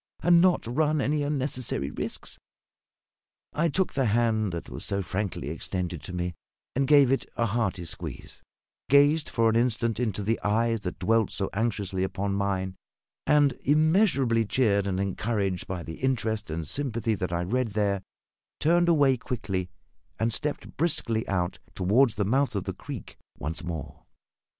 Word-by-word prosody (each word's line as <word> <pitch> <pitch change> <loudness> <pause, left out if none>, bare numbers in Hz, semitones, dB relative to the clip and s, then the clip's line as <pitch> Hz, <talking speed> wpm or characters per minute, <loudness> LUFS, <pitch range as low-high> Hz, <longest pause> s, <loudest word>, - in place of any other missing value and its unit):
and 170 0 +6
not 180 -1 +3
run 150 +6 +1
any 145 +2 +1
unnecessary 130 - -1
risks?" - - -6 1.1
I 170 +2 +1
took 185 +5 0
the 135 -2 +1
hand 110 -2 +2
that 85 -1 -5
was - - -5
so 100 0 -1
frankly 95 -5 -3
extended 90 -1 -4
to 90 - -7
me, 90 0 -2 0.4
and 135 +1 +1
gave 140 -3 +6
it 135 - 0
a 115 - +2
hearty 100 -5 -1
squeeze; - - -8 0.5
gazed 145 +2 +5
for 115 -1 +2
an 110 - +2
instant 115 -1 +1
into 105 -4 -1
the 115 +3 0
eyes 115 +2 +1
that 95 -3 -5
dwelt 115 -1 +2
so 95 - -1
anxiously 100 -4 -1
upon 100 +1 -2
mine; 95 -1 -1 0.5
and, 145 -2 +5
immeasurably 150 - +3
cheered 100 -3 +2
and 95 -1 -1
encouraged 100 -1 -1
by 90 -2 -4
the 80 +1 -7
interest 110 -6 -1
and 80 0 -4
sympathy 120 - -1
that 90 -3 -3
I 85 0 0
read 115 +3 -1
there, 100 -2 +1 0.6
turned 175 +2 +3
away 140 -5 +4
quickly 95 -7 -3 0.5
and 115 0 +1
stepped 150 +3 -3
briskly 115 -8 0
out 90 -2 -1 0.2
toward 110 +9 +4
the 105 -2 -1
mouth 130 +3 +1
of 100 - -1
the - - -4
creek - - -8 0.2
once 80 +3 -3
more. 80 -4 -6
110 Hz, 160 wpm, -27 LUFS, 95-135 Hz, 1.1 s, and